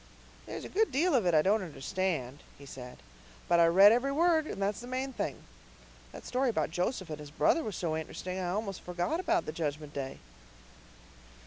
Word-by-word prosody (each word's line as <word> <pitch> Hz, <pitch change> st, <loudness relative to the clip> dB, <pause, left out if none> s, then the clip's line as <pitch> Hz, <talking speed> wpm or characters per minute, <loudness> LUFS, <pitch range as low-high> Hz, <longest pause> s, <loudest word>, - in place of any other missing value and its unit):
"There's -, -, -6 dB
a -, -, -7 dB
good 440 Hz, +2 st, +1 dB
deal 320 Hz, +6 st, +2 dB
of 230 Hz, -9 st, +3 dB
it 170 Hz, -, +3 dB
I 155 Hz, -, +5 dB
don't 205 Hz, +3 st, +3 dB
understand," 155 Hz, -4 st, -3 dB, 0.2 s
he 140 Hz, -, -13 dB
said, 125 Hz, -2 st, -9 dB, 0.5 s
"but 170 Hz, 0 st, +4 dB
I 170 Hz, -, +6 dB
read 195 Hz, +5 st, +8 dB
every 245 Hz, +4 st, +2 dB
word, 320 Hz, +1 st, +3 dB
and -, -, -5 dB
that's 200 Hz, +1 st, -1 dB
the 245 Hz, -, -9 dB
main 260 Hz, +1 st, -3 dB
thing. -, -, -4 dB, 0.7 s
That -, -, -11 dB
story 255 Hz, +1 st, +1 dB
about 220 Hz, -, -1 dB
Joseph 180 Hz, 0 st, -2 dB
and 150 Hz, -, -5 dB
his 150 Hz, -1 st, -9 dB
brother 315 Hz, -, +2 dB
was 210 Hz, -, -4 dB
so 165 Hz, -3 st, -2 dB
int'resting 180 Hz, +4 st, -4 dB
I 180 Hz, -1 st, -2 dB
almost 195 Hz, 0 st, -3 dB
forgot 180 Hz, -, -2 dB
about 350 Hz, -1 st, +1 dB
the -, -, -3 dB
Judgment 150 Hz, -2 st, -4 dB
Day." 135 Hz, -1 st, -5 dB
185 Hz, 200 wpm, -31 LUFS, 155-255 Hz, 0.7 s, read